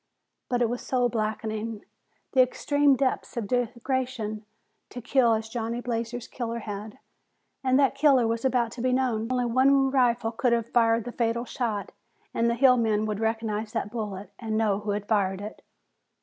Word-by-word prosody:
But 245 -1 +1
it - - +3
was 245 - -3
soul 250 -2 +1
blackening, 220 -1 -3 0.5
the 260 - +6
extreme 285 +2 +3
depths 260 -1 -1
of 230 - -1
degradation, 240 -2 -2 0.4
to 245 - -7
kill 245 -1 +3
as 220 0 -3
Johnny 230 +1 -3
Blazer's 235 -1 -3
killer 235 -2 -4
had, 210 0 -7 0.7
and 260 0 +3
that 275 -1 +4
killer 275 -3 +4
was 230 0 -1
about 245 -3 +1
to 245 - -7
be 255 0 +1
known. 250 -3 0
Only 250 -1 +1
one 270 +3 +3
rifle 245 -3 +2
could 235 +1 +1
have 235 0 0
fired 230 -1 +3
the 245 - -6
fatal 235 0 -1
shot, 225 -6 -3 0.4
and 230 0 +2
the 235 - +1
hill 255 0 +5
men 215 -2 +1
would 210 -1 -2
recognize 220 -1 -2
that 205 - -2
bullet 210 -4 -5
and 220 -2 -2
know 210 -3 +1
who 210 0 -6
had 205 0 -2
fired 195 -3 +1
it. 210 +2 -8
235 Hz, 180 wpm, -26 LUFS, 220-250 Hz, 0.7 s, the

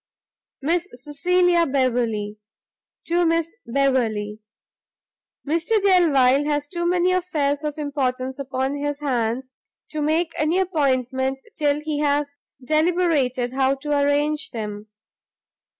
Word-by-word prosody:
Miss 345 +4 0
Cecilia 340 +6 +2
Beverley 235 -6 0 0.7
To 345 +1 +1
Miss 330 0 0
Beverley. 230 -5 0 1.1
Mr 335 +8 +1
Delvile 295 -9 +4
has 290 -1 -1
too 345 +1 -2
many 360 +1 +2
affairs 305 -6 0
of 300 0 -3
importance 265 -3 -2
upon 265 0 -2
his 290 0 -3
hands, 255 -1 -1 0.4
to 310 -1 -3
make 320 +3 +1
any 310 +4 +2
appointment 265 -7 0 0.2
till 295 -3 +1
he 300 -1 -3
has 290 -1 +1 0.3
deliberated 305 -5 +1
how 265 0 +2
to 295 +2 -6
arrange 290 +2 +1
them. 210 -2 -6
290 Hz, 110 wpm, -23 LUFS, 260-325 Hz, 1.1 s, Delvile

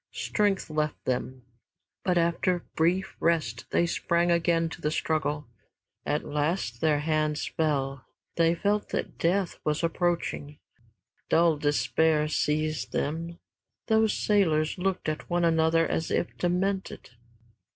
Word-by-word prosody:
Strength 205 -6 0
left 150 -1 -2
them, 130 0 -2 0.6
but 180 -1 +1
after 170 +1 +1
brief 175 +4 +1
rest 155 -8 0
they 170 - +2
sprang 170 +1 +1
again 170 -1 +2
to - - -9
the 150 - 0
struggle. 150 -1 -1 0.6
At 150 - 0
last 150 -5 -1
their 150 -2 +2
hands 155 -1 0
fell. 140 -4 -1 0.3
They 165 0 +3
felt 205 +4 0
that - - -4
death 180 +1 0
was 150 +2 -1
approaching. 165 -3 -1 0.7
Dull 165 -1 +4
despair 150 +1 +2
seized 155 0 -1
them. 165 +3 -2 0.5
Those 220 -1 +4
sailors 165 -6 +1
looked 190 -1 -1
at 155 0 -3
one 175 -1 +2
another 165 0 +3
as 160 - -2
if - - -1
demented. 190 -2 -2
165 Hz, 125 wpm, -27 LUFS, 150-175 Hz, 0.7 s, Dull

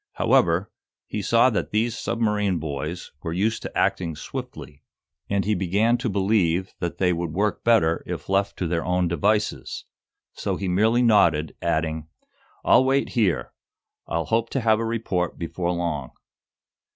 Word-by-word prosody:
However, 85 +3 +2 0.3
he 105 - -4
saw 115 +5 +4
that 105 - -1
these 110 +2 0
submarine 105 -5 0
boys 75 +2 -5
were 80 - -4
used 110 +6 0
to - - -6
acting 85 -4 0
swiftly, 70 0 -8 0.5
and 100 -1 0
he 105 - +2
began 100 +5 +2
to 125 -1 -1
believe 95 -3 +1
that 85 -1 -3
they 90 -1 +2
would 85 -2 -3
work 105 +3 0
better 105 -9 +3
if - - -5
left 100 +1 0
to 90 - -1
their 85 0 -1
own 90 0 +1
devices. 105 +5 -1 0.5
So - - -2
he 95 - -4
merely 110 +7 +3
nodded, 80 - +3
adding: 80 -2 -1 0.6
"I'll - - +6
wait 135 +1 +1
here. 105 -8 0 0.5
I'll 85 0 -1
hope 115 0 0
to 135 - -1
have 110 -1 +3
a 115 - -1
report 110 -6 -2
before 85 +1 -3
long." 85 -7 -2
95 Hz, 155 wpm, -24 LUFS, 85-110 Hz, 0.6 s, I'll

